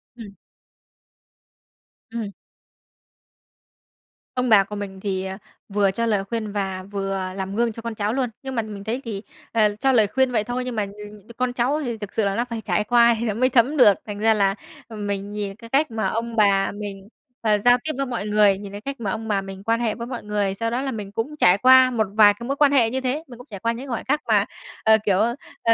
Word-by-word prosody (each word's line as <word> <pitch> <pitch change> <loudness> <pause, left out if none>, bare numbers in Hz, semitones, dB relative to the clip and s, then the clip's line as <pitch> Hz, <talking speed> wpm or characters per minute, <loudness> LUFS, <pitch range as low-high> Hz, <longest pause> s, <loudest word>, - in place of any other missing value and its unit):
Ừm. 205 -4 -11 1.8
Ừm. 225 -3 -4 2.0
Ông 250 -1 0
bà 205 -3 +7
của 210 +2 -8
mình 195 -2 -6
thì, 190 -1 -2
ờ, 190 0 -5 0.3
vừa 200 -1 +2
cho 230 +4 -1
lời 205 -3 +1
khuyên 215 0 -4
và 190 -2 -3
vừa 195 -1 -2
làm 195 +1 -4
gương 235 0 +1
cho 230 - -9
con 230 -1 -5
cháu 210 +2 -1
luôn. 255 -3 0
Nhưng 265 -1 -5
mà 230 - +1
mình 205 -2 -8
thấy 240 +5 -3
thì, 205 -3 -4 0.3
ờ, 210 -2 +2
cho 270 0 +3
lời 220 -5 +4
khuyên 265 +3 +1
vậy 215 -3 +1
thôi 245 +2 -3
nhưng 250 -2 -4
mà, 210 - 0
ừm, 210 0 -10 0.2
con 250 -1 0
cháu 255 +5 +1
thì 235 -3 -3
thực 205 -2 -8
sự 220 - +1
là 195 0 0
nó 240 - 0
phải 230 -1 -4
trải 210 - 0
qua 235 +1 +5
thì 235 - -2
nó 215 - 0
mới 255 +4 +2
thấm 255 +5 +3
được. 210 -6 +7
Thành 205 -1 -6
ra 220 +1 +4
là 195 -1 +2 0.3
mình 205 -2 -4
nhìn 205 -2 -4
cái 230 +1 -13
cách 275 +2 +2
mà 220 -3 -1
ông 230 +3 -3
bà 200 -3 +3
mình, 205 -1 -7 0.3
ờ, 215 -2 +3
giao 245 +4 +5
tiếp 310 - -2
với 275 - 0
mọi 235 -5 -4
người, 210 -2 +4
nhìn 200 -1 -8
cái 205 +1 -8
cách 275 +1 -6
mà 200 -4 -2
ông 220 +2 -4
bà 200 -2 +1
mình 195 0 -9
quan 230 +2 +1
hệ 230 -3 0
với 235 0 -6
mọi 250 -4 -6
người, 205 -2 -1
sau 230 +4 -2
đó 250 +2 -1
là 275 - -2
mình 210 -4 -6
cũng 235 +8 -3
trải 180 +2 +6
qua 255 +2 +7
một 220 -4 0
vài 210 -1 +7
cái 235 +3 -9
mối 275 - -1
quan 285 -1 +4
hệ 240 -5 +4
như 260 +2 -2
thế. 270 +5 -1
Mình 240 -2 -11
cũng 245 - -13
trải 200 - -6
qua 230 +3 0
những 250 +4 -6
khoảnh 235 - -3
khắc 295 +3 +1
mà, - - +3 0.4
ờ, 220 0 +6
kiểu, 195 -3 +3 0.5
ờ, 230 - +5
220 Hz, 245 wpm, -23 LUFS, 200-240 Hz, 2.0 s, bà